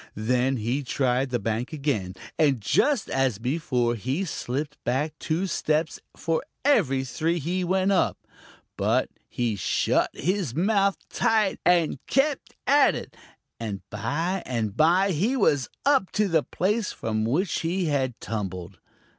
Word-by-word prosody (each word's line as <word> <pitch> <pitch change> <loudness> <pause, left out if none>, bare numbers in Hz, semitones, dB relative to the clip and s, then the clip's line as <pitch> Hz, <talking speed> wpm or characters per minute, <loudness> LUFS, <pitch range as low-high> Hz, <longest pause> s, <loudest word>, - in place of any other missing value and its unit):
Then 125 +4 +1
he 120 +6 -1
tried 130 0 0
the 125 - 0
bank 115 +3 -2
again, 135 - -2 0.2
and 140 -5 +3
just 255 - +2
as 130 -5 +1
before 125 - 0
he 130 - -2
slipped 145 -1 -4
back 140 +6 0
two 165 +4 -1
steps 155 -3 0 0.2
for 165 -1 -1 0.2
every 150 - +3
three 160 +7 -1
he 175 +4 -1
went 190 +2 +1
up. 190 - +2 0.6
But - - +1 0.2
he 120 -3 -1
shut 95 - +1
his 180 - -1
mouth 200 +2 +2
tight 215 -3 +1
and 170 -6 +2
kept 275 +1 0
at 285 +1 +5
it, - - -7 0.4
and 105 -4 -4
by 165 - -1
and 110 -5 -2
by 180 +7 +4
he 210 - +1
was 145 - +2 0.2
up 275 -9 +3
to 210 -1 +2
the 165 -4 +3
place 205 +7 -1
from 110 -1 -2
which 155 - 0
he 175 +2 -1
had 135 -6 -1
tumbled. 95 -4 -5
150 Hz, 145 wpm, -26 LUFS, 120-185 Hz, 0.6 s, at